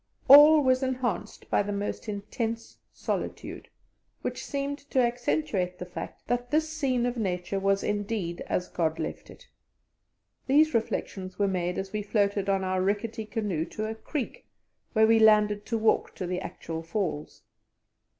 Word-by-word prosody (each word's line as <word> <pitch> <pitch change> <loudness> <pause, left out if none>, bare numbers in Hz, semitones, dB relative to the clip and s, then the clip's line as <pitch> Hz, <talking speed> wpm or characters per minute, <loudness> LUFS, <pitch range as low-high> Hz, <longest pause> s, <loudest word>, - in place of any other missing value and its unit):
All 295 +2 +9
was 255 0 +3
enhanced 255 -5 -2
by - - +4
the 205 0 -3
most 205 +2 -3
intense 225 +3 -4
solitude, - - -4 0.5
which - - -3
seemed 280 +1 -3
to - - -3
accentuate 180 - 0
the 180 - -6
fact 180 +1 -8
that 245 +1 -1
this 310 +3 +2
scene 275 -6 0
of 245 0 -2
Nature 185 -2 -2
was 195 0 +1
indeed 205 -4 -2
as 180 - -1
God 160 -2 -1
left - - -5
it. - - -15 1.0
These 305 +3 +4
reflections 190 -4 -2
were 200 - +2
made 180 -2 -1
as 190 +1 -4
we 215 - -1
floated 200 -1 0
on 195 -1 +2
in 190 - -2
our 185 0 0
rickety 215 +3 -1
canoe 205 -8 -1
to 215 +4 -5
a 220 - -3
creek, 290 - -5 0.5
where 220 -2 +5
we 225 0 +5
landed 210 -1 +4
to 230 - 0
walk 220 0 +1
to 185 - -4
the 180 +1 -2
actual 165 -2 -6
Falls. 165 -3 -4
210 Hz, 160 wpm, -28 LUFS, 185-245 Hz, 1.0 s, All